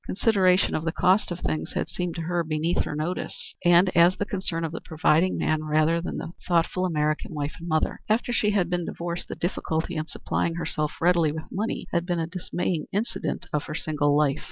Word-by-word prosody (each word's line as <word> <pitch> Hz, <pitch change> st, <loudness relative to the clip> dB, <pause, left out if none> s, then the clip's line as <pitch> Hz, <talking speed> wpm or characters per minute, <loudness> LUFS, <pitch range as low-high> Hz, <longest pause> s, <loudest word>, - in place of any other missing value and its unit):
Consideration 190 Hz, -3 st, +3 dB
of 155 Hz, -, -1 dB
the 165 Hz, -, 0 dB
cost 185 Hz, +5 st, +3 dB
of 175 Hz, 0 st, -5 dB
things 155 Hz, -, -2 dB
had -, -, -1 dB
seemed 180 Hz, -2 st, -3 dB
to 165 Hz, -, -3 dB
her 175 Hz, +1 st, 0 dB
beneath 160 Hz, +2 st, 0 dB
her -, -, -4 dB
notice, 160 Hz, +5 st, -4 dB
and 175 Hz, +2 st, +5 dB
as 175 Hz, +2 st, +6 dB
the 205 Hz, -, -1 dB
concern 185 Hz, -4 st, -2 dB
of 160 Hz, -, -4 dB
the 165 Hz, -, -6 dB
providing 160 Hz, +2 st, +2 dB
man 155 Hz, 0 st, 0 dB
rather 155 Hz, +2 st, +2 dB
than 180 Hz, -, -4 dB
the -, -, -5 dB, 0.2 s
thoughtful 175 Hz, +1 st, +2 dB
American 155 Hz, -1 st, -1 dB
wife 145 Hz, 0 st, -2 dB
and 170 Hz, -, -7 dB
mother. 155 Hz, -1 st, 0 dB
After 235 Hz, +3 st, +1 dB
she 210 Hz, -2 st, +2 dB
had 200 Hz, -4 st, +2 dB
been 175 Hz, -1 st, -1 dB
divorced 170 Hz, +1 st, -4 dB
the -, -, -5 dB
difficulty 165 Hz, -1 st, -2 dB
in 155 Hz, 0 st, -2 dB
supplying 165 Hz, 0 st, -2 dB
herself 155 Hz, -3 st, -2 dB
readily 170 Hz, -2 st, +3 dB
with 155 Hz, +1 st, -5 dB
money 215 Hz, +4 st, -2 dB
had 170 Hz, 0 st, 0 dB
been 175 Hz, -2 st, 0 dB
a 165 Hz, -, 0 dB
dismaying 175 Hz, -1 st, -3 dB
incident 210 Hz, +4 st, -2 dB
of 150 Hz, -, 0 dB
her 150 Hz, -, -5 dB
single 145 Hz, -2 st, +1 dB
life. 150 Hz, -1 st, +2 dB
170 Hz, 210 wpm, -26 LUFS, 155-180 Hz, 0.2 s, as